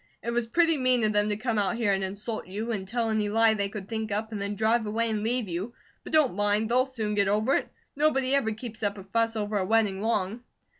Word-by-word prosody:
It 235 - -2
was 235 -1 -1
pretty 330 +5 +3
mean 255 -3 +2
of 215 0 +2
them 205 0 +2
to 210 - -1
come 225 -1 -1
out 200 +2 +1
here 230 -3 +1
and 195 0 0
insult 205 +3 -3
you, 215 +5 -4
and 195 -4 -3
tell 230 +1 -1
any 215 -1 0
lie 225 +1 +4
they 200 -2 -1
could 195 -2 -7
think 220 -1 -4
up, 215 +2 -2
and 210 -2 -4
then 200 +1 -3
drive 220 +2 +1
away 225 +2 0
and 215 -1 -1
leave 235 +1 -1
you; 185 +7 -4 0.3
but - - -9
don't 305 - +4
mind, 205 +2 +1
they'll 255 +2 +3
soon 220 -5 -3
get 200 -1 +2
over 215 +6 +2
it. - - 0 0.3
Nobody 275 -3 +2
ever 275 -6 +2
keeps 220 +1 -8
up 205 -1 -1
a 195 - -8
fuss 225 +3 0
over 210 -1 -1
a - - 0
wedding 205 -1 +1
long." 215 0 -1
220 Hz, 255 wpm, -27 LUFS, 205-235 Hz, 0.3 s, lie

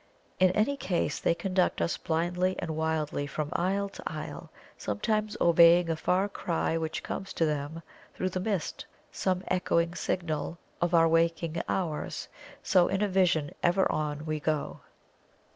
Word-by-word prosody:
In 185 0 +6
any 225 +8 +1
case 175 - -1
they 170 - +2
conduct 185 +1 0
us 170 - 0
blindly 175 +3 0
and 170 - -3
wildly 155 -2 -1
from 150 +1 -4
isle 195 +3 0
to - - -11
isle, 155 -2 -6 0.3
sometimes 210 - -1
obeying 170 0 +6
a - - 0
far 180 +5 +1
cry 170 -4 -1
which 160 -1 -2
comes 195 - -5
to 165 - +1
them 150 +2 -3 0.3
through 185 - -1
the 185 - -3
mist 195 -3 -3 0.2
some 185 -1 -1
echoing 170 -2 +1
signal 170 -3 -2 0.2
of 175 0 +2
our 165 0 +6
waking 165 0 +1
hours. 165 -5 -2 0.3
So 180 -2 +4
in 195 +2 0
a - - +2
vision 175 -6 +2
ever 180 +2 +3
on 150 0 -2
we 155 -1 -2
go! 150 0 -2
170 Hz, 155 wpm, -29 LUFS, 160-185 Hz, 0.3 s, In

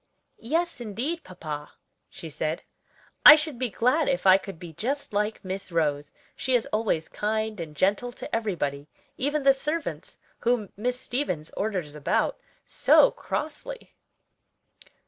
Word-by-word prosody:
"Yes, 325 +3 -1
indeed, 250 - -3
papa," 155 -5 -7 0.4
she 165 - -9
said, 155 +1 -3 0.6
"I 300 - +13
should 305 -5 -3
be 255 -2 0
glad 255 +9 +2
if 270 -5 -1
I 190 0 +8
could 195 -2 -9
be 170 -1 -10
just 275 - -3
like 210 0 -1
Miss 190 0 -5
Rose, 150 -3 0 0.2
she 260 -1 0
is 240 - +2
always 210 -7 0
kind 215 0 -2
and 155 -3 -6
gentle 205 - +1
to - - -5
everybody; 150 -10 -2 0.3
even 290 +2 -1
the 275 0 +7
servants, 300 +4 -4 0.2
whom 235 -4 0
Miss 250 +4 -2
Stevens 180 - -3
orders 185 -8 -3
about 150 -2 0 0.3
so - - +5
crossly." 460 +12 -5
215 Hz, 140 wpm, -26 LUFS, 170-270 Hz, 0.6 s, I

